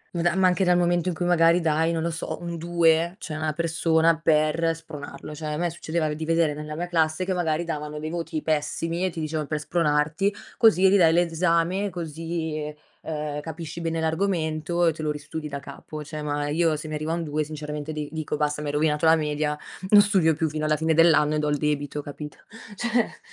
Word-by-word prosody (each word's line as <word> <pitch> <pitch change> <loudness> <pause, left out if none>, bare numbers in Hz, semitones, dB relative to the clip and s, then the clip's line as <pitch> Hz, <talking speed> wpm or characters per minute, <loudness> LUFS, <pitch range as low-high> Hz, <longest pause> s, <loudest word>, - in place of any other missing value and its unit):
ma 170 - 0
da 175 +1 +2
ma 190 0 +3
anche 185 +1 +3
dal 180 -1 +4
momento 175 0 +2
in 175 - -3
cui 175 - -2
magari 170 0 +4
dai, 160 0 +1
non 165 -1 -1
lo 170 - -1
so, 165 +1 -4
un 170 -1 -5
2 170 0 +2
cioè 165 -7 -6
a - - -4
una 155 -1 -1
persona 165 0 +2
per 165 +1 +2
spronarlo. 150 -2 -9
Cioè 155 +1 -6
a - - -2
me 175 +1 0
succedeva 160 -2 -2
di 155 +1 -5
vedere 165 -2 +2
nella 150 +1 -6
mia 175 +3 -2
classe 165 0 +1
che 190 - 0
magari 170 -2 0
davano 150 -2 -4
dei 155 +1 -4
voti 165 -2 -3
pessimi 160 +3 -1
e - - +1
ti 165 - -7
dicevan 155 -1 -2
"Per 155 - -1
spronarti, 150 +4 +1 0.3
così 195 -5 +6
ridai 185 -4 +5
l'esame, 170 +3 +1
così, 160 -2 -4 0.3
uhm, 150 -2 -4
capisci 160 +1 -7
bene 165 -1 -1
l'argomento 160 0 0
e 165 - +3
te 155 - -8
lo 155 - -1
ristudi 150 +1 -5
da 140 - -4
capo". 150 +2 -9
Cioè 155 +1 -6
ma 145 0 -2
io 160 +1 +2
se 155 +1 -6
mi 155 - -6
arriva 155 +2 -2
un 170 0 -2
2 155 0 -1
sinceramente 150 0 -6
di 150 -1 -4
dico 155 -1 -3
basta, 150 0 -1
mi 150 - -4
hai 145 - -2
rovinato 150 +1 +1
la 160 - +7
media, 150 -1 -1 0.3
non 205 0 +9
studio 190 -6 +3
più 160 - 0
fino 155 0 -3
alla 155 0 +3
fine 160 +1 +1
dell'anno 160 -2 +5
e 150 - +1
do 150 0 0
il 145 - +1
debito 145 0 -2
capito. 150 +1 -8 0.4
Cioè 240 +2 0
160 Hz, 220 wpm, -25 LUFS, 150-170 Hz, 0.4 s, non